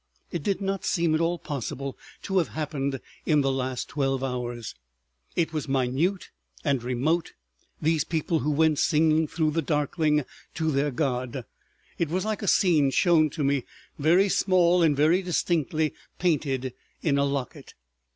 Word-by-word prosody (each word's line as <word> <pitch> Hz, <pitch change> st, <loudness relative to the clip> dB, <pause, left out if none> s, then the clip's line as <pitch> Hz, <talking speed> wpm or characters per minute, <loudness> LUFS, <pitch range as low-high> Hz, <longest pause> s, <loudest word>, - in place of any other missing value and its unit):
It 170 Hz, -, -3 dB
did 200 Hz, +6 st, -1 dB
not 195 Hz, 0 st, -2 dB
seem 170 Hz, -2 st, +1 dB
at 155 Hz, -, +2 dB
all 170 Hz, +1 st, +1 dB
possible 140 Hz, -2 st, -5 dB, 0.3 s
to 190 Hz, -1 st, +1 dB
have 165 Hz, -, +1 dB
happened 140 Hz, -3 st, -2 dB, 0.3 s
in 150 Hz, -2 st, +4 dB
the 135 Hz, -1 st, +1 dB
last 130 Hz, -1 st, -2 dB
twelve 135 Hz, -2 st, -1 dB
hours. 120 Hz, -3 st, -4 dB, 0.6 s
It 165 Hz, -1 st, 0 dB
was 155 Hz, -2 st, -3 dB
minute 135 Hz, +8 st, 0 dB, 0.3 s
and 140 Hz, -5 st, +1 dB
remote, 135 Hz, +8 st, 0 dB, 0.5 s
these 160 Hz, 0 st, +2 dB
people 160 Hz, 0 st, -1 dB
who 150 Hz, -, -1 dB
went 155 Hz, 0 st, +3 dB
singing 160 Hz, 0 st, +3 dB
through 155 Hz, 0 st, 0 dB
the 165 Hz, +2 st, 0 dB
darkling 150 Hz, 0 st, +1 dB, 0.3 s
to 160 Hz, -2 st, 0 dB
their 140 Hz, +1 st, +1 dB
God. 125 Hz, -2 st, -2 dB, 0.5 s
It 170 Hz, -, 0 dB
was 185 Hz, +4 st, -1 dB
like 215 Hz, -1 st, -2 dB
a 205 Hz, -, -3 dB
scene 160 Hz, -8 st, +4 dB
shown 155 Hz, +2 st, +4 dB
to 150 Hz, +1 st, -4 dB
me, 140 Hz, -2 st, +1 dB, 0.4 s
very 170 Hz, +7 st, +4 dB
small 180 Hz, -2 st, +3 dB
and 155 Hz, -4 st, +3 dB
very 160 Hz, +6 st, +4 dB
distinctly 160 Hz, -4 st, 0 dB, 0.2 s
painted, 135 Hz, -7 st, 0 dB, 0.3 s
in 140 Hz, -3 st, +2 dB
a -, -, +3 dB
locket. 140 Hz, -3 st, -4 dB
150 Hz, 160 wpm, -26 LUFS, 135-170 Hz, 0.6 s, in